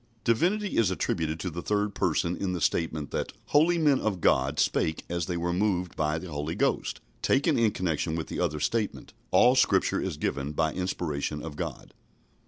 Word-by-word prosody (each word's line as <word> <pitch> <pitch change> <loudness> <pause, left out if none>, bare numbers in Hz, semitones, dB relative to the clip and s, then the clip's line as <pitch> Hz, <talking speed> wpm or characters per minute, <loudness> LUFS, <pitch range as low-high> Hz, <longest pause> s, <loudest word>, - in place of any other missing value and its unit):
" 110 - -37
Divinity 185 - +1
is 115 -5 +4
attributed 80 -3 -1
to 90 - -3
the 85 +2 -5
third 105 +2 0
Person 85 -2 0
in 95 -1 -2
the 90 - -2
statement 80 -3 -1
that - - -3 0.2
"holy 165 +4 +4
men 150 -5 +3
of 100 -4 -1
God 70 -2 +2
spake 80 0 +1
as 85 -2 -2
they 90 - -2
were 85 +1 -1
moved 90 -2 0
by 75 0 0
the 85 +1 -7
Holy 75 +2 -3
Ghost," - - 0 0.2
taken 145 +4 +2
in 115 -2 +4
connection 80 -4 -1
with 80 -1 -2
the - - -5
other 75 -4 0
statement, 105 +8 -2 0.2
"all 125 +1 +6
Scripture 130 - +3
is - - -3
given 70 +2 -2
by 80 0 0
inspiration 75 -5 -3
of 80 -3 -6
God." - - -6
90 Hz, 190 wpm, -28 LUFS, 80-105 Hz, 0.2 s, all